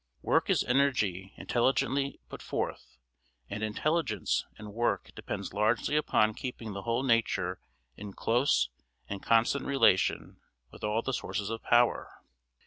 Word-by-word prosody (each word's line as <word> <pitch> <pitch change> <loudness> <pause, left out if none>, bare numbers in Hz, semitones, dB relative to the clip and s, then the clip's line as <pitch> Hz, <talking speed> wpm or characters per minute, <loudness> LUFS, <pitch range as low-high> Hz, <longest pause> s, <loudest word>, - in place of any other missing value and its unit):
Work - - +2
is - - +3
energy 110 -9 +1
intelligently 135 +3 0
put - - -9
forth; - - -4 0.5
and 105 - -4
intelligence 110 - 0
in 105 -1 -9
work 115 -4 -1
depends - - -5
largely 110 +7 +1
upon 110 -7 +3
keeping 115 -3 -6
the 100 - -5
whole 115 +4 -1
nature 105 -7 +1 0.4
in 100 -1 -8
close 120 - +2 0.4
and 100 -1 -5
constant 115 +5 +2
relation 130 -10 +2 0.3
with - - -14
all 105 +2 0
the 135 - -2
sources 105 -3 -3
of 115 - -4
power. 120 0 +2
115 Hz, 135 wpm, -30 LUFS, 105-130 Hz, 0.5 s, is